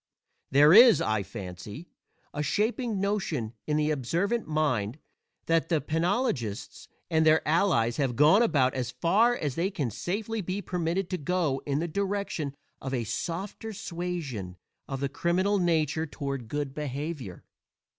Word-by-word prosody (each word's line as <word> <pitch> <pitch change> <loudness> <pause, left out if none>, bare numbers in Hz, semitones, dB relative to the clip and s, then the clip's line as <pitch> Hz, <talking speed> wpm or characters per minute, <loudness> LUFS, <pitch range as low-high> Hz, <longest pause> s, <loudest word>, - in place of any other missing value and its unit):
There 145 +4 +6
is, 235 +2 +9
I 110 -1 0
fancy, 100 - -8 0.5
a 145 - -2
shaping 220 - 0
notion 190 - -1
in 150 0 +1
the 155 0 +1
observant 170 - -1
mind 145 -7 0 0.5
that 165 -1 +1
the 165 -3 +2
penologists 160 - -2 0.2
and 160 -1 +3
their 155 0 +4
allies 155 - +2
have 135 -4 0
gone 155 - +6
about 140 - +3
as 125 -2 -2
far 210 - +3
as 145 - -2
they 170 +7 0
can 145 - -3
safely 205 - -3
be 185 +2 -3
permitted 180 -1 -2
to 185 - -1
go 155 -3 0
in 140 -1 0
the 165 +3 -1
direction 195 -5 -2 0.3
of 135 0 -3
a 120 - -1
softer 190 - -4
suasion 170 - -5 0.3
of 135 -1 -4
the 140 - +1
criminal 180 +8 +1
nature 160 -2 +1
toward 140 -5 -5
good 145 +2 -3
behavior. 145 - -5
155 Hz, 145 wpm, -28 LUFS, 135-190 Hz, 0.5 s, is